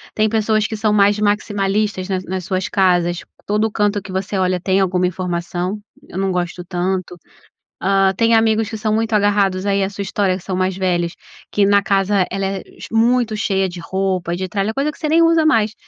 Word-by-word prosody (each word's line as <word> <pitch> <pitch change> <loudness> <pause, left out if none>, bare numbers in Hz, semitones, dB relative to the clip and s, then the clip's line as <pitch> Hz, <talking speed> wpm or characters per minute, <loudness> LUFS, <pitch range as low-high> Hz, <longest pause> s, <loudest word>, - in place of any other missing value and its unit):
Tem 215 0 +3
pessoas 215 -1 +1
que 220 - -3
são 215 0 0
mais 205 0 +3
maximalistas 205 -1 0
nas 185 -1 -1
nas 185 -1 -4
suas 185 -1 -1
casas, 175 -3 +2 0.3
todo 210 +2 0
canto 205 -1 0
que 190 - -10
você 190 +1 -2
olha 185 -1 +1
tem 190 +1 +1
alguma 185 -1 +1
informação, 180 +1 -3 0.3
eu - - -8
não 195 0 0
gosto 180 0 -3
tanto. 185 0 -2 0.7
Hã, 195 0 +3
tem 230 +1 +2
amigos 225 -1 +2
que 220 - -5
são 215 0 0
muito 225 +1 -1
agarrados 200 -2 +2
aí 200 0 +1
a 190 - -1
sua 205 0 -5
história, 195 -1 0
que 185 - -10
são 190 - -3
mais 185 0 0
velhos, 175 -2 0 0.4
que 205 -1 +2
na 200 0 +4
casa 195 -1 +2
ela 195 +1 -2
é 195 0 -3 0.2
ch - - -8
muito 230 0 +2
cheia 195 -3 0
de 175 -1 -8
roupa, 185 -1 -2
de 185 +1 -4
tralha, 200 +2 -1
coisa 280 +5 -1
que - - -18
você 310 - -2
nem 320 +2 +4
usa 330 -1 +4
mais, 220 -8 +2
195 Hz, 210 wpm, -19 LUFS, 185-215 Hz, 0.7 s, na